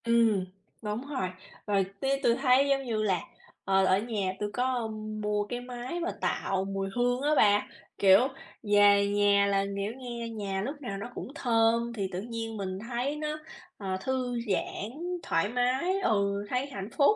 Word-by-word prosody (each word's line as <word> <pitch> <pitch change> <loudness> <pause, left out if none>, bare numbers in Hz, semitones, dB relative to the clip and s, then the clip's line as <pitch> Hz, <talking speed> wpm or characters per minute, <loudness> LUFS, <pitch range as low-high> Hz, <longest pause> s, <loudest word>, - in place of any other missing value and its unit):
Ừm, 230 -5 +3 0.4
đúng 220 +5 -4
rồi, 260 -11 -2 0.4
rồi 200 -2 +2
tía 275 0 +1
tui 235 - +4
thấy 260 +1 +4
giống 275 0 +2
như 235 -4 -2
là, 190 -4 +2 0.5
ờ, 195 0 +4
ở 190 0 +4
nhà 205 -4 -2
tui 210 - -1
có 250 -2 0 0.3
mua 210 0 0
cái 245 +4 -4
máy 250 +6 -5
mà 345 +1 -1
tạo 190 0 0
mùi 195 0 -2
hương 245 +1 +1
á 290 - +1
bà, 205 -1 +4 0.3
kiểu, 200 +5 +6 0.4
về 205 -1 +5
nhà 205 0 +4
là, 195 0 +2
kiểu, 200 +2 -2
nghe 240 -2 -5
nhà 200 -4 -3
lúc 285 +7 -5
nào 200 -7 -4
nó 235 +5 -6
cũng - - -5
thơm 230 -2 +2
thì 200 -4 -2
tự 180 0 -3
nhiên 225 0 -5
mình 190 -1 -3
thấy 245 +5 -2
nó, 300 0 -3 0.4
ờ, 190 -2 -3
thư 255 0 -1
giãn, 205 +3 -3 0.3
thoải 165 +5 +1
mái, 255 - +1
ừ, 200 - +1
thấy 250 +2 0
hạnh 200 -7 -6
phúc, 290 +9 +5
225 Hz, 180 wpm, -29 LUFS, 200-250 Hz, 0.5 s, kiểu